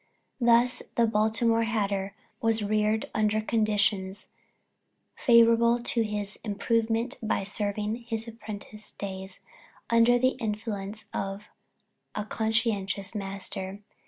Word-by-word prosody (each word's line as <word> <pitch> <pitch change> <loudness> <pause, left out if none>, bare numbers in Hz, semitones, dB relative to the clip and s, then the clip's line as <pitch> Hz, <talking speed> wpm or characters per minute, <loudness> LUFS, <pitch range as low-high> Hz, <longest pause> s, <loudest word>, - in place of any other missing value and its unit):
Thus 240 +1 +4
the 235 - +4
Baltimore 225 +1 +2
hatter 200 -3 -1 0.3
was 225 -1 +2
reared 215 +1 +1
under 215 0 +2
conditions 210 -3 0 0.9
favorable 235 -1 +5
to 240 -1 +1
his 210 -2 -3
improvement 225 +3 0
by 220 -3 0
serving 210 +2 -2
his 225 0 -1
apprentice 215 -1 -9
days 190 -1 -7 0.5
under 230 +1 +5
the 255 +1 +4
influence 210 -2 -4
of 195 +1 -3 0.7
a 210 - -2
conscientious 215 -3 -1
master. 195 -1 -5
215 Hz, 100 wpm, -28 LUFS, 205-230 Hz, 0.9 s, favorable